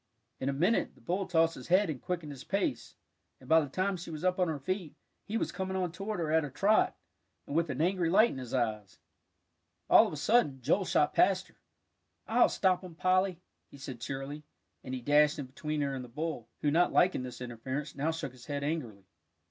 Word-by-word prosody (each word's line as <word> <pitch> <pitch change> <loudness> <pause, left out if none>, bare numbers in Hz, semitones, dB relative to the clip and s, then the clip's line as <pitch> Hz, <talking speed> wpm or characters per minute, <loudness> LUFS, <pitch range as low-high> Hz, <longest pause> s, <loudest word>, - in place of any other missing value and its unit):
In 135 - -1
a - - +2
minute, 175 +11 +1
the - - -21
bull 185 +2 -2
tossed 165 -2 +3
his 125 - -10
head 185 +3 +4
and 150 -6 -4
quickened 170 -4 -4
his 135 -1 -9
pace, 195 - -2 0.4
and 130 - -16
by 160 +2 +6
the 145 - -4
time 185 +6 -1
she 170 - -8
was 155 0 -6
up 185 0 +1
on 180 - +3
her 160 -2 -2
feet, 180 +2 -4 0.3
he 220 - -2
was - - -1
coming 190 0 -3
on 180 -2 -1
toward 195 +3 -4
her 160 -2 -1
at 160 0 +3
a 145 - -4
trot, 200 +10 +2 0.5
and 140 - -6
with 165 -1 +2
an 130 +1 -2
angry 175 0 +1
light 215 +6 +5
in 135 - -6
his 125 -2 -8
eyes. 110 -6 -2 0.9
All - - +8
of - - -6
a - - -5
sudden, 145 - +2
Joel 165 +10 +1
shot 150 - +2
past 190 0 +3
her. - - -27 0.6
"I'll - - +4
stop 185 -1 +1
him, 180 -3 -10
Polly," 185 0 +1 0.3
he - - -13
said 130 -3 -8
cheerily, 135 +3 -5 0.4
and 130 - -4
he 125 - -5
dashed 150 +3 +4
in 145 - -4
between 150 +3 -4
her 140 -1 -1
and 130 -1 -4
the 125 - -11
bull, 150 -3 -4
who, 145 - +3
not 175 +3 +3
liking 180 -6 +3
this 125 -1 -7
interference, 130 +4 -5
now 145 +3 0
shook 160 -5 -3
his 125 -1 -15
head 145 -1 -3
angrily. 125 -11 -3
155 Hz, 225 wpm, -31 LUFS, 135-185 Hz, 0.9 s, All